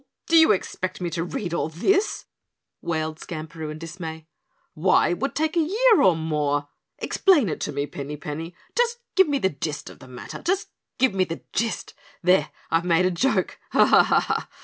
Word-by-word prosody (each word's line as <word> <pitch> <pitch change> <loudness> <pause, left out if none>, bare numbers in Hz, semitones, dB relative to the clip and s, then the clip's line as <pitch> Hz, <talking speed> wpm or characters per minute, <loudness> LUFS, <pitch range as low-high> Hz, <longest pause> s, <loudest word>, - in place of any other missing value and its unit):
Do 335 - +2
you 320 -1 +7
expect 185 -1 -2
me 175 -2 -3
to 165 0 -2
read 175 0 -4
all 165 - -1
this?" 390 - +1 0.6
wailed 160 -1 -2
Skamperoo 160 -1 -7
in 155 - -6
dismay. 160 -1 -7 0.5
"Why, 175 +5 +3
it 175 - -2
would 275 - -2
take 315 +3 0
a - - +3
year 430 +8 +4
or 185 -3 +5
more. 150 -2 -1 0.3
Explain 310 - +3
it 150 - -3
to - - -3
me, 140 - -2
Pinny 145 +1 -7
Penny. 160 +4 -6 0.2
Just 475 0 +1 0.2
give 380 -2 +6
me 285 - +2
the 190 -8 +1
gist 145 0 -5
of - - -16
the 130 - -13
matter. 125 -1 -9
Just 380 +3 -1 0.3
give 260 -4 +3
me 190 -1 +2
the 165 -2 -5
gist 230 +1 -2 0.3
there, 180 +2 +4 0.2
I've 165 +1 +2
made 175 0 +3
a 185 - +2
joke. 260 +10 0
Ha! - - +6
ha! - - +3
175 Hz, 190 wpm, -24 LUFS, -, 0.6 s, you